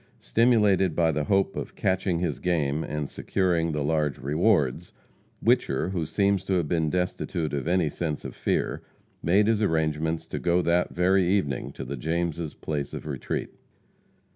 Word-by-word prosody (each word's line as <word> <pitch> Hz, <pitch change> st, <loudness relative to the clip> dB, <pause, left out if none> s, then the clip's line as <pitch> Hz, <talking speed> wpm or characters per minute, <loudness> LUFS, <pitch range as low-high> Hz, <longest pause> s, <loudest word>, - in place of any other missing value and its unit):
Stimulated 105 Hz, -7 st, +3 dB
by 80 Hz, -1 st, +3 dB
the 75 Hz, -1 st, -1 dB
hope 95 Hz, -1 st, +1 dB
of -, -, -5 dB
"catching 95 Hz, -2 st, 0 dB
his 85 Hz, -6 st, -2 dB
game," 80 Hz, -2 st, 0 dB
and 75 Hz, -2 st, -3 dB
securing 85 Hz, -2 st, 0 dB
the 75 Hz, -2 st, -1 dB
large 75 Hz, -2 st, 0 dB
rewards, 75 Hz, -, +1 dB, 0.5 s
Whicher, 95 Hz, -, +2 dB
who 85 Hz, -5 st, -2 dB
seems 100 Hz, 0 st, +1 dB
to 95 Hz, -, 0 dB
have 85 Hz, -4 st, +1 dB
been 80 Hz, -1 st, +1 dB
destitute 90 Hz, -2 st, -2 dB
of 70 Hz, +1 st, -2 dB
any 90 Hz, -2 st, +2 dB
sense 75 Hz, 0 st, -3 dB
of -, -, -6 dB
fear, -, -, -1 dB, 0.4 s
made 95 Hz, +5 st, +3 dB
his 110 Hz, 0 st, +2 dB
arrangements 80 Hz, -3 st, 0 dB
to -, -, -3 dB
go 90 Hz, +1 st, +2 dB
that 85 Hz, +2 st, +2 dB
very 90 Hz, +1 st, +2 dB
evening 90 Hz, -10 st, 0 dB
to 65 Hz, -, -7 dB
the 70 Hz, +2 st, -5 dB
Jameses' 85 Hz, +2 st, -2 dB
place 75 Hz, -2 st, -4 dB
of -, -, -7 dB
retreat. 70 Hz, -4 st, -4 dB
85 Hz, 165 wpm, -26 LUFS, 75-95 Hz, 0.5 s, Stimulated